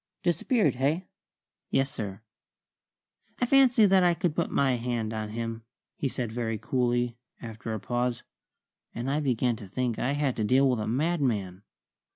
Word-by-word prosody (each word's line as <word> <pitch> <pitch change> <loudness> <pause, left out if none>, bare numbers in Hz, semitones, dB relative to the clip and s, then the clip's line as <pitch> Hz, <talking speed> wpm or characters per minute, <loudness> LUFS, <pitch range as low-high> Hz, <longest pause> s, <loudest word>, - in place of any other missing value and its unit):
"Disappeared, 175 - +2
hey?" 150 +8 +1 0.6
"Yes, 135 0 +1
sir." 100 -2 -6 1.2
"I - - +2
fancy 255 -4 +5
I 185 -3 +4
could 170 -3 -1
put 170 - 0
my 140 -1 +2
hand 115 -2 -2
on 110 -1 -3
him," 115 +1 -4 0.3
he 140 - -1
said 120 -3 -3
very 115 -1 -2
coolly, 120 0 0 0.2
after 115 -1 -7
a 110 - -2
pause. 120 +2 -2 0.7
And 120 +4 -2
I 145 - +1
began 125 -4 +1
to 100 - -10
think 120 +3 -2
I 135 - 0
had 145 -3 0
to 110 - 0
deal 130 +6 +4
with 125 -3 +1
a 105 - -2
madman. 120 - 0
125 Hz, 160 wpm, -28 LUFS, 115-145 Hz, 1.2 s, fancy